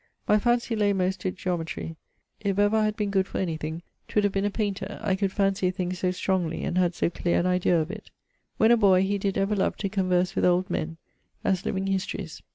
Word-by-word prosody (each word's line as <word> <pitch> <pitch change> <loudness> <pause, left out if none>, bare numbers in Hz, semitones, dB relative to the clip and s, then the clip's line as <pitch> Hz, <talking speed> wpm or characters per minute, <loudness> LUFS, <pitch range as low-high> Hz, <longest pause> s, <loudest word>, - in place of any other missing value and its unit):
My 210 - +5
fancy 240 +1 +1
lay 205 -2 +2
most 190 0 0
to 185 - 0
geometrie. 170 -3 -4 0.4
If 200 -3 -1
ever 205 +1 +3
I 215 -1 +3
had 215 0 0
been 205 -2 -1
good 190 -1 +2
for - - -5
anything, 160 -2 -3 0.2
'twould 210 - +1
have 205 -1 +1
been 195 +1 0
a - - +2
painter, 200 -1 -3
I 195 -3 +2
could 195 0 0
fancy 195 -1 +1
a - - +1
thing 185 -1 -3
so 185 0 -1
strongly 180 -2 -1
and - - -2
had 180 -1 +2
so - - 0
cleare 175 0 0
an 175 - 0
idaea 180 -1 +3
of 160 +3 -2
it. 215 0 -9 0.5
When 220 +1 +5
a 240 - +6
boy, 190 -4 +5
he 200 +1 0
did 195 0 -1
ever 195 +2 +1
love 195 - 0
to 200 - -2
converse 185 -2 +1
with - - 0
old 180 +2 +2
men, 165 +1 -2 0.5
as 190 -1 0
living 190 0 -1
histories. 190 -4 -3
190 Hz, 235 wpm, -26 LUFS, 180-205 Hz, 0.5 s, a